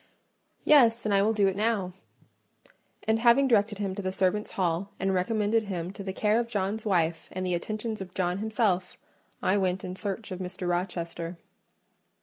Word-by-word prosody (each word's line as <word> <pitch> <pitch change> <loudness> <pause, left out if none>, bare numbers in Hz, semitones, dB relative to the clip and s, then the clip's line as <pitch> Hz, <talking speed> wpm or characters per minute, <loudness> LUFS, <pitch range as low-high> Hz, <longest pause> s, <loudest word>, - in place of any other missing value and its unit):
"Yes; 235 -7 +5
and 210 - +1
I 195 - +4
will 210 +2 +3
do 205 -3 +3
it 190 - 0
now;" 205 -3 0 1.1
and 220 0 +3
having 240 +4 +5
directed 210 -3 +2
him 195 -2 -2
to 200 - -4
the 185 -1 -2
servants' 190 +2 0
hall, 180 +1 0
and 195 +1 +1
recommended 215 +3 +1
him 180 -2 -4
to 200 - -8
the 190 - -3
care 210 +3 +2
of 235 - -1
John's 215 0 -2
wife, 170 -4 0
and 185 0 -3
the 180 - 0
attentions 215 +4 -3
of 185 -1 -8
John 180 0 0
himself, 215 -4 0 0.5
I 200 +2 +3
went 185 -1 0
in 180 0 -5
search 205 +1 -4
of 185 - -5
Mr. 185 0 -5
Rochester. 175 -1 -3
195 Hz, 180 wpm, -28 LUFS, 185-215 Hz, 1.1 s, Yes